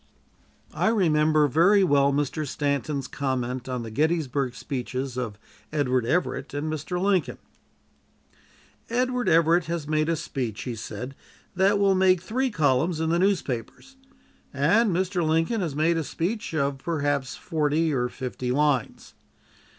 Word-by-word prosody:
I - - 0
remember 155 -8 +3
very 180 +8 +4
well 140 -4 +3
Mr. 145 +2 -1
Stanton's 140 -1 -2
comment 130 -2 -3
on 125 -2 -3
the 115 - -7
Gettysburg 140 -2 0
speeches 130 -1 -4
of 115 -5 -4 0.3
Edward 130 -5 0
Everett 145 -3 -1
and 155 +2 -2
Mr. 155 +4 -3
Lincoln. 180 -10 +1 1.5
"Edward 250 +1 0
Everett 165 +1 +4
has 165 -3 -4
made 155 +1 +1
a 165 - +2
speech," 130 -9 -4
he 125 - -4
said, 125 +4 -6 0.4
"that 195 +2 +3
will 200 -1 +3
make 185 -1 +4
three 255 +7 0
columns 155 - +1
in 160 0 0
the 170 - +2
newspapers, 185 - -2 0.6
and 175 - +3
Mr. 185 0 0
Lincoln 165 +7 +1
has 160 -6 -3
made 165 +3 +2
a 165 - -1
speech 175 +4 -3
of 140 -2 0
perhaps 145 -4 -1
forty 155 0 0
or 125 -2 0
fifty 125 -1 -5
lines. 145 -3 0
155 Hz, 140 wpm, -25 LUFS, 135-175 Hz, 1.5 s, very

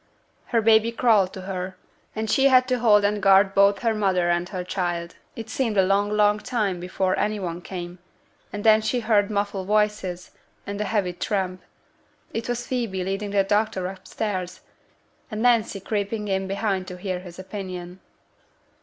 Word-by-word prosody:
Her 230 -3 +1
baby 225 +1 +4
crawled 220 -6 +3
to 190 - -7
her, 185 0 -5 0.4
and 220 0 -2
she 270 +5 +4
had 255 -1 +5
to 250 -1 +1
hold 210 -3 +5
and 205 0 0
guard 195 0 +5
both 200 +1 +4
her 230 -1 +2
mother 185 -5 +1
and 175 +1 -1
her 185 -3 -4
child. 175 -2 -3 0.2
It 225 -1 -7
seemed 225 -2 -1
a 190 - +6
long, 200 +2 +2
long 210 0 +3
time 210 -5 -1
before 185 +1 -1
any 210 0 0
one 175 -2 -4
came, 175 -1 -7 0.5
and 205 0 -5
then 220 -1 +6
she 240 +3 -1
heard 210 -3 +2
muffled 200 -2 -2
voices, 210 -4 0 0.3
and 200 +1 -4
a - - 0
heavy 200 -5 0
tramp: 185 0 -2 0.7
it 225 +1 -4
was 245 0 -2
Phoebe 230 -8 -2
leading 195 +2 -3
the 200 -1 +2
doctor 205 -1 0
upstairs, 185 0 -4 0.7
and 215 0 -4
Nancy 230 -4 +2
creeping 210 +2 -3
in 190 0 -1
behind 195 -1 -1
to 180 - -7
hear 185 -1 -3
his 180 -1 -11
opinion. 185 -2 -7
200 Hz, 170 wpm, -24 LUFS, 185-215 Hz, 0.7 s, a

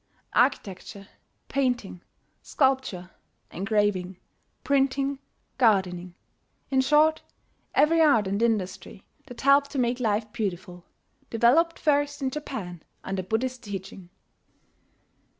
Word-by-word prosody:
Architecture, 195 +1 -1 0.4
painting, 245 -9 -1 0.4
sculpture, 260 -10 0 0.4
engraving, 195 -2 -1 0.5
printing, 275 0 +1 0.4
gardening 185 -6 +1 0.6
in 265 -1 +3
short, 300 +3 +3 0.5
every 325 +2 +4
art 235 -10 +4
and 200 +3 -2
industry 215 -5 -2 0.2
that 245 -3 -10
helped 280 +1 +4
to 285 - -6
make 245 0 0
life 215 -1 -1
beautiful 180 -5 -4 0.5
developed 270 +9 +3
first 290 -1 +1
in 265 -2 -2
Japan 215 - -6 0.2
under 190 0 -3
Buddhist 240 +6 -2
teaching. 195 -3 -8
230 Hz, 95 wpm, -26 LUFS, 190-275 Hz, 0.6 s, every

